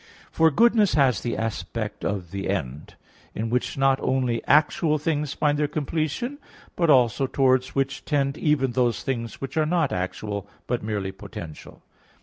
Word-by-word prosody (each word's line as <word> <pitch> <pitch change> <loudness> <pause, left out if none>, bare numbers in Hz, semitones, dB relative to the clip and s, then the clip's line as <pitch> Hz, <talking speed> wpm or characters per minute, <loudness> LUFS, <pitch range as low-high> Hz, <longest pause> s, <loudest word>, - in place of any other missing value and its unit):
For 160 0 +4
goodness 220 +4 +4
has 135 -5 +3
the 120 - -2
aspect 115 -1 -4
of 95 -4 -3
the 100 -1 -4
end, 75 -7 -4 0.4
in 115 +1 -3
which 125 +2 -1
not 135 0 +3
only 125 -3 0
actual 155 +1 +3
things 150 -2 -1
find 145 -1 +1
their 150 - +2
completion, 155 - -2 0.4
but 170 -2 +1
also 130 -1 +4
towards 130 -1 +2
which 135 0 -1
tend 140 -1 0
even 145 -5 +1
those 120 -1 0
things 115 -4 -3
which 135 +4 -6
are 155 -1 +2
not 165 -3 +1
actual, 100 +2 -4 0.2
but 120 -1 -1
merely 100 -3 -3
potential. 95 -5 -10
135 Hz, 155 wpm, -24 LUFS, 110-150 Hz, 0.4 s, For